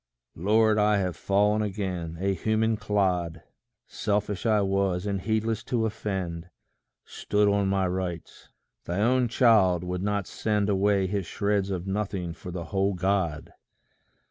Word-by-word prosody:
Lord, 110 +4 +3
I 105 0 +3
have 90 -3 -1
fallen 105 +2 +2
again 95 -5 -3
a 100 +1 +1
human 110 +4 +1
clod! 95 -6 -1 0.4
Selfish 105 +1 -2
I 105 -2 +3
was, 95 -1 0
and 100 -2 -2
heedless 110 +1 -1
to 115 -3 0
offend; 95 -6 -4 0.6
Stood 105 0 0
on 100 -1 +2
my 95 -1 +1
rights. 90 -2 -5 0.4
Thy 85 - -3
own 125 +3 +3
child 110 -8 +4
would 90 0 -3
not 100 -1 -1
send 105 0 -1
Away 100 0 +2
his 100 -1 -2
shreds 100 -1 0
of 90 -2 -3
nothing 95 -3 -3
for 90 - -10
the 85 -1 -5
whole 95 0 +1
God! 90 -4 -1
100 Hz, 145 wpm, -27 LUFS, 90-105 Hz, 0.6 s, child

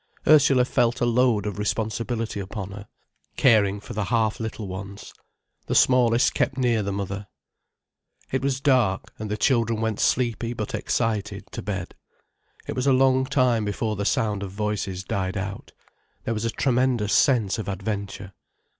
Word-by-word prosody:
Ursula 140 -4 +5
felt 120 -1 +1
a - - +2
load 120 -3 +2
of 105 -1 -4
responsibility 110 +1 -2
upon 95 0 -6
her, 100 +1 -9 0.5
caring 105 -5 +4
for 110 - -9
the 105 -2 -2
half 110 0 0
little 110 -2 -5
ones. 100 +2 -8 0.5
The - - -1
smallest 125 -2 +4
kept 130 - 0
near 120 -4 +2
the 100 0 -2
mother. 100 +1 -4 1.0
It 130 - 0
was 135 -1 0
dark, 125 -9 +1
and 110 -1 -5
the 105 - -2
children 115 -1 +1
went 110 -2 -1
sleepy 120 -1 0
but 110 -3 -5
excited 105 -4 -2
to - - -5
bed. 95 -3 -4 0.7
It - - -4
was 130 +1 -1
a 135 - +5
long 130 0 +3
time 125 -5 +2
before 105 +1 -2
the 100 - -3
sound 105 -2 0
of 100 - -4
voices 100 -2 -3
died 95 +1 -2
out. 100 +1 -5 0.5
There 115 - -1
was 110 0 -3
a - - +1
tremendous 120 -3 +1
sense 115 -8 +3
of 110 - -5
adventure. 100 -1 -5
110 Hz, 165 wpm, -24 LUFS, 100-120 Hz, 1.0 s, Ursula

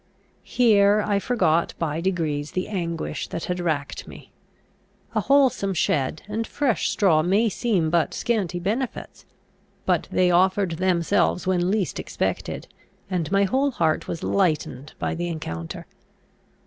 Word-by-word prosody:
Here 210 -3 +4
I 200 -1 +1
forgot 180 -8 +1
by 160 -1 -2
degrees 160 -5 -1
the 185 - -2
anguish 170 -5 -3
that 165 - -5
had 180 0 -2
racked 155 -5 -2
me. - - -12 0.8
A - - +1
wholesome 265 -9 +3
shed 145 -2 0
and 220 +2 -3
fresh 275 -7 0
straw 170 -7 +3
may 200 +7 +2
seem 190 -6 0
but 170 -2 +1
scanty 210 -7 -1
benefits; 220 +8 -4 0.6
but - - +1
they 180 -1 +3
offered 185 -1 +2
themselves 180 -1 +1
when 180 -1 +1
least 200 -2 -1
expected, - - -3 0.4
and 175 -3 -1
my 200 0 +4
whole 265 +8 +2
heart 165 - 0
was 165 - -5
lightened 155 -6 0
by - - -2
the 175 +1 -3
encounter. 80 - -5
180 Hz, 135 wpm, -24 LUFS, 165-205 Hz, 0.8 s, Here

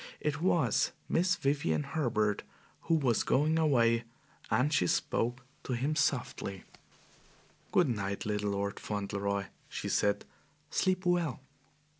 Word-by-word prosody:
It 150 0 -2
was 160 - +2
Miss 180 +2 +2
Vivian 135 - 0
Herbert, 110 - 0 0.4
who 165 - +3
was 130 -8 +2
going 155 +4 +2
away, 120 -7 +3 0.5
and 145 +5 +2
she 90 - +3
spoke 120 +7 0 0.2
to 130 - -3
him 135 +6 0
softly. 125 - -1 1.1
"Good 180 - +4
night, 100 -5 -2
little 105 -1 -1
Lord 100 0 -2
Fauntleroy," 100 -1 -2 0.2
she - - -4
said. 100 0 +1 0.5
"Sleep 185 0 +1
well." 175 -8 +1
125 Hz, 120 wpm, -31 LUFS, 100-155 Hz, 1.1 s, Good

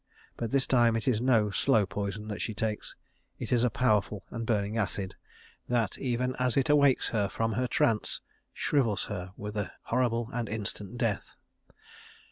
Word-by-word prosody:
But 115 - -3
this 135 +2 +2
time 120 -3 +4
it 115 +2 -2
is 115 -4 +2
no 115 -5 +3
slow 110 +1 +3
poison 100 +2 -4
that 105 - -4
she 110 - -3
takes. 110 0 -3 0.4
It - - -5
is 120 -1 +4
a 125 - +4
powerful 105 -3 +1
and 115 -1 -4
burning 105 -1 0
acid 100 -3 -1 0.6
that 120 -4 +1
even 125 0 -1
as 125 0 +1
it 135 +1 +3
awakes 140 -3 +4
her 105 -3 0
from 115 +3 -1
her 125 +4 0
trance, 115 -2 +1 0.3
shrivels 115 -10 +1
her 90 -1 -5
with 105 +1 -6
a 100 -3 -2
horrible 120 -1 0
and 120 -2 -2
instant 105 0 -4
death. 115 -5 -1
115 Hz, 170 wpm, -29 LUFS, 105-125 Hz, 0.6 s, time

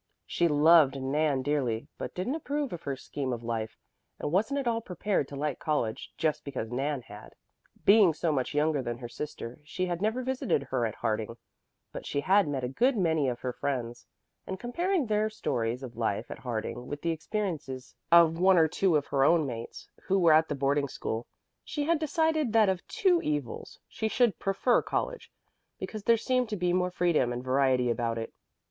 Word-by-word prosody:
She 170 - +1
loved 150 -2 +5
Nan 140 0 0
dearly, 130 -4 -1
but - - -5
didn't 185 +9 -2
approve 290 - -2
of 170 - -6
her 140 -3 -3
scheme 130 0 -4
of 120 -1 -4
life, 115 -1 -3 0.4
and - - -3
wasn't 220 - +1
at 270 - -3
all 230 -1 +1
prepared 190 - -1
to 145 - -9
like 145 -1 -2
college 135 -8 -2
just 155 -2 0
because 130 -5 -5
Nan 135 +1 -2
had. 105 0 -12 0.5
Being 200 -3 +7
so 165 0 0
much 135 -1 -1
younger 150 -1 +2
than 120 -2 -4
her 120 -1 -7
sister, 120 -1 -7
she 180 +5 -3
had 175 -1 -3
never 220 +5 0
visited 255 - 0
her 130 -3 -1
at 110 - -7
Harding, 110 0 -2 0.5
but - - -7
she 140 - -1
had 195 +3 +4
met 135 -3 -2
a - - 0
good 240 - +2
many 160 -7 +2
of 120 -1 -5
her 125 -1 -3
friends; 120 -4 -4 0.4
and 190 - -4
comparing 340 +7 0
their 215 0 +1
stories 125 - -2
of 120 -2 -8
life 110 -3 -2
at - - -7
Harding 120 0 -4
with 145 0 -6
the 170 - +1
experiences 160 - -4 0.2
of 165 -1 +6
one 185 0 +5
or 160 -1 +6
two 180 +2 +1
of 145 -1 +2
her 135 -1 +1
own 165 +1 +4
mates 115 -3 -7 0.2
who 195 - +2
were 170 -4 +5
at 160 +1 +4
the 145 - -1
boarding 140 +1 +1
school, 115 -2 -4 0.4
she 295 - -3
had 330 +1 +2
decided 315 -4 +1
that 220 -3 +5
of 185 -2 -2
two 360 -3 +2
evils 145 -6 -3
she 220 - -3
should 235 -1 +2
prefer 195 +5 +2
college, - - -3 0.5
because 215 -2 -6
there 230 -1 +5
seemed 250 +1 0
to 215 - -2
be 180 -1 +1
more 180 0 +1
freedom 170 -8 +1
and 120 +1 -4
variety 130 -2 +2
about 115 -1 -1
it. 115 - -5
150 Hz, 200 wpm, -29 LUFS, 130-200 Hz, 0.5 s, Being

